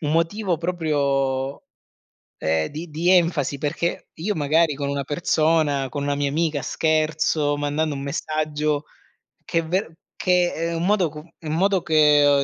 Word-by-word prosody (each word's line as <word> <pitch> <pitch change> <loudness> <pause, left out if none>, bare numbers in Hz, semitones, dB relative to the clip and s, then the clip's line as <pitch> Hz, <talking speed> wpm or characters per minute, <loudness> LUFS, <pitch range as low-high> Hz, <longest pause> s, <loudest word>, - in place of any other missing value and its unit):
un 150 -2 -1
motivo 175 +1 0
proprio, 140 -6 -1 0.7
ehm, 80 0 0
di 160 +3 -7
di 165 +4 0
enfasi, 165 -6 +2
perché 155 +4 -2
io 190 +5 -2
magari 155 +1 +2
con 140 0 -3
una 140 0 -2
persona, 155 -3 +1
con 145 +2 -4
una 145 0 0
mia 140 0 0
amica, 155 -1 0
scherzo 155 -1 +1
mandando 145 +1 -1
un 135 - -5
messaggio 150 0 -1 0.6
che 165 - 0
è 165 - -1
ver 175 -1 -1 0.2
che 180 -1 +2
è 165 +1 -2
un 165 - -2
modo 195 -5 +3
com 150 +2 -11
un 155 -1 -3
modo 190 +1 +2
che 150 -3 +5
155 Hz, 155 wpm, -23 LUFS, 145-165 Hz, 0.7 s, che